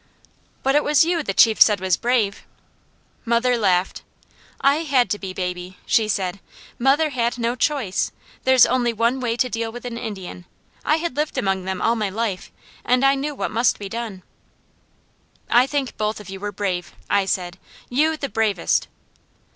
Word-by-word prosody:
"But 270 - +2
it 295 +1 +3
was 300 +1 +4
you, 340 -1 0
the 275 - -2
chief 220 +2 +4
said 210 -3 +7
was 185 -1 +1
brave!" 230 -3 0 0.8
Mother 240 +1 +2
laughed. 190 -5 +1 0.6
"I 280 +2 +3
had 280 -6 +1
to 205 - -1
be, 190 -2 -5
baby," 180 0 -5
she 220 -2 +2
said. 195 -2 -2 0.4
"Mother 285 +5 +3
had 240 -2 -1
no 235 0 -1
choice. 255 -8 0 0.3
There's 260 -1 +6
only 245 -2 +1
one 230 +4 +1
way 235 -2 -1
to 250 - +2
deal 230 -1 -3
with 245 +1 -9
an 235 -1 -5
Indian. 190 -5 -7 0.4
I 305 - +3
had 335 +1 -3
lived 300 +1 -2
among 190 -1 0
them 190 0 -3
all 230 - +3
my 215 -3 -1
life, 205 -2 -3 0.3
and 250 +2 +2
I 275 - +5
knew 285 +2 -3
what - - -3
must 230 +3 +2
be 200 -1 -7
done." 220 -4 -6 1.3
"I 245 +2 +5
think 275 -2 -2
both 215 0 -1
of 205 -2 -10
you 195 - -7
were 205 +1 -4
brave," 185 -3 -3
I 200 -1 +2
said, 180 -1 -2 0.3
"you, 310 +5 +1
the 280 - -3
bravest!" 215 -7 0
230 Hz, 180 wpm, -22 LUFS, 195-260 Hz, 1.3 s, said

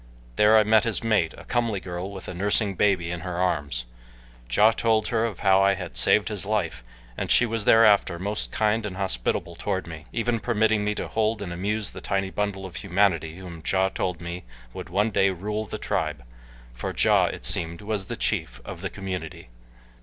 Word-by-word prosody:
There 105 +1 +6
I 110 - +6
met 110 0 +4
his 115 -1 -1
mate, 110 -8 +1
a - - -11
comely 115 -5 -1
girl 90 0 -5
with 95 -2 -8
a - - -5
nursing 100 +2 +1
baby 95 -3 +1
in 85 - -3
her 90 0 -5
arms. 75 -9 -1 0.7
Ja 105 - +6
told 110 -1 +1
her 115 -1 +1
of 110 -6 -5
how 95 -1 +5
I 100 0 +4
had 90 -3 -7
saved 105 +1 +3
his 105 -5 -3
life, 90 - -2 0.3
and - - -4
she 120 - +5
was 115 -2 -2
thereafter 105 -6 +5
most 100 +4 -3
kind 110 +1 +1
and 95 -2 -7
hospitable 85 -1 -1
toward 95 +1 -2
me, 80 -1 -9
even 115 0 0
permitting 110 -2 +1
me 105 0 -1
to - - -4
hold 110 0 0
and 90 -3 -5
amuse 105 +4 -2
the - - -9
tiny 95 -1 -1
bundle 100 -2 -2
of 90 -2 -8
humanity 90 -4 +1
whom 90 -3 -9
Ja 95 0 +2
told 90 -2 -3
me 85 +1 -6 0.3
would - - -7
one 105 +3 +1
day 100 -1 +3
rule 105 +4 -3
the - - -6
tribe, - - -2 0.5
for - - -5
Ja, - - +4
it - - -4
seemed, 85 +2 0
was 105 -2 -2
the - - -5
chief - - -1
of - - -8
the - - -3
community. 90 -9 -6
100 Hz, 200 wpm, -25 LUFS, 90-105 Hz, 0.7 s, There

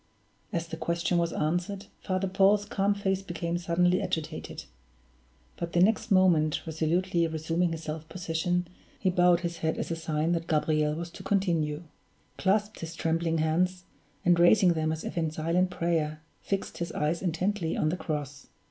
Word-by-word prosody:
As 170 -1 -1
the 165 -1 -6
question 170 +2 0
was 170 -1 0
answered, 175 +7 -1
Father 185 0 -1
Paul's 200 +2 +3
calm 200 0 +1
face 195 -1 0
became 170 -2 -3
suddenly 180 +1 +2
agitated; 155 0 -4 0.9
but 170 0 -4
the 175 - +3
next 215 +4 +3
moment, 175 -6 +3
resolutely 165 +2 +1
resuming 165 +2 0
his 165 0 -5
self 155 0 -6
possession, 175 0 -1 0.3
he 185 - +2
bowed 175 -1 +4
his 170 -1 -3
head 160 0 -1
as - - -3
a - - 0
sign 160 0 -1
that 170 -1 -1
Gabriel 150 -1 +1
was 170 +1 -5
to - - -10
continue; 170 -6 0 0.6
clasped 205 +3 +1
his 165 0 -6
trembling 165 0 0
hands, 180 +4 +1 0.4
and 175 -1 +5
raising 180 +1 +6
them 155 -1 0
as 160 0 -4
if - - -3
in 160 -1 0
silent 165 +4 +1
prayer, 160 -3 -1 0.2
fixed 195 -1 -3
his 170 - -3
eyes 155 +3 0
intently 180 0 -1
on 155 - +2
the 170 - 0
cross. 145 -5 -5
170 Hz, 165 wpm, -28 LUFS, 160-180 Hz, 0.9 s, raising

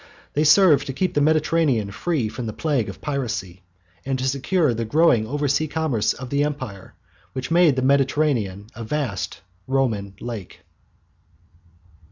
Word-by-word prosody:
They 150 - +2
served 160 -1 +5
to 135 - -3
keep 185 +7 -1
the 145 - +2
Mediterranean 155 -8 +2
free 130 +3 -1
from 115 +2 -5
the 110 - -4
plague 140 -8 -1
of 100 - -10
piracy, 115 - -3 0.4
and 135 -1 -1
to 130 +1 -2
secure 140 +2 +1
the 115 0 -2
growing 120 -3 +3
oversea 145 +3 0
commerce 145 -9 0
of 130 -1 -9
the 140 +1 +2
Empire 130 -10 -5 0.4
which 130 -1 -4
had - - 0
made 170 -5 +5
the 130 - -1
Mediterranean 130 -7 +1
a 115 - -7
vast 105 -8 -3 0.3
Roman 115 -8 -1
lake. 115 -6 -7
135 Hz, 155 wpm, -23 LUFS, 110-150 Hz, 0.4 s, served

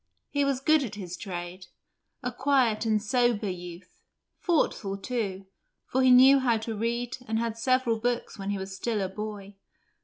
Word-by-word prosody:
He 285 -1 +1
was 275 -2 0
good 310 +2 +4
at 220 -6 -4
his 180 -4 -6
trade; 180 -1 -7 0.6
a 250 - -2
quiet 250 -4 +1
and 215 -1 +3
sober 235 -1 +1
youth; 175 0 -10 0.4
thoughtful, 215 - 0
too, 195 -3 -3 0.4
for 260 - 0
he 260 - +5
knew 260 +2 +8
how 240 -3 +2
to 220 0 -4
read 235 +3 -2
and 220 - 0
had 230 +1 0
read 220 - -14
several 255 -2 +2
books 240 +1 -2
when 195 0 -4
he 200 - -1
was 190 0 -6
still 220 +2 -2
a 190 - -1
boy. 205 0 -7
225 Hz, 180 wpm, -27 LUFS, 195-250 Hz, 0.6 s, knew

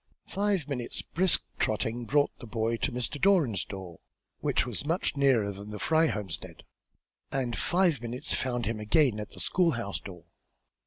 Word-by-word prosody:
Five 200 -6 0
minutes' 125 -5 -3
brisk 185 +1 +2 0.2
trotting 115 +2 0
brought 145 +5 +3
the 120 - -9
boy 115 +1 0
to 135 - -1
Mr. 125 +4 -3
Doran's 170 - +4
door, 95 -4 -8 0.4
which - - +1
was 120 -1 -3
much 165 +1 0
nearer 130 -7 +3
than 100 +1 -9
the 105 - -5
Fry 160 +8 +3
homestead, 100 - -4 0.7
and 135 -3 0
less - - -3
than - - -6
five 175 -2 +2
minutes 125 +4 -3
found 120 -2 -1
him 110 0 -2
again 110 +1 +3
at 105 - -5
the - - -12
school 180 -2 +2
house 115 -5 -3
door. 90 -4 -10
120 Hz, 175 wpm, -29 LUFS, 105-150 Hz, 0.7 s, Doran's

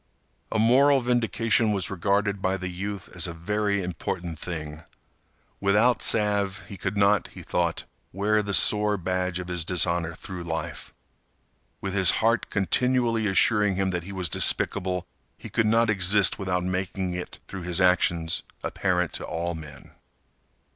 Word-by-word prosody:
A - - 0
moral 135 +5 +4
vindication 115 -2 +1
was 95 -2 -3
regarded 100 +2 0
by 95 +1 0
the 95 -1 -5
youth 95 +2 -5
as 85 -1 +1
a 85 - -6
very 100 +3 -1
important 85 -1 -4
thing. 75 -3 -6 0.8
Without 105 +4 +3
salve, 105 -2 +1
he 100 - -9
could 100 - -4
not, 100 0 +3
he - - -12
thought, 85 -2 -1 0.3
wear 105 +3 +1
the 100 -1 -4
sore 105 0 +4
badge 90 0 -2
of 90 -1 -5
his 90 -2 -1
dishonor 85 -1 0
through 90 +1 -8
life. 80 -1 -5 0.9
With 95 -1 -3
his 95 -2 +4
heart 115 +1 +1
continually 115 +2 +1
assuring 105 0 +3
him 95 0 0
that 90 -1 -2
he 95 +3 -9
was 95 -2 -2
despicable, 90 +3 +2 0.3
he - - -10
could 115 -2 +1
not 115 +1 +3
exist 100 -2 +3
without 90 -2 -1
making 95 0 -2
it, 90 0 -7
through 95 - -7
his 90 0 -1
actions, 85 -3 +2 0.2
apparent 90 -3 -1
to - - -5
all 85 +1 -3
men. 80 -3 -11
95 Hz, 155 wpm, -25 LUFS, 90-105 Hz, 0.9 s, moral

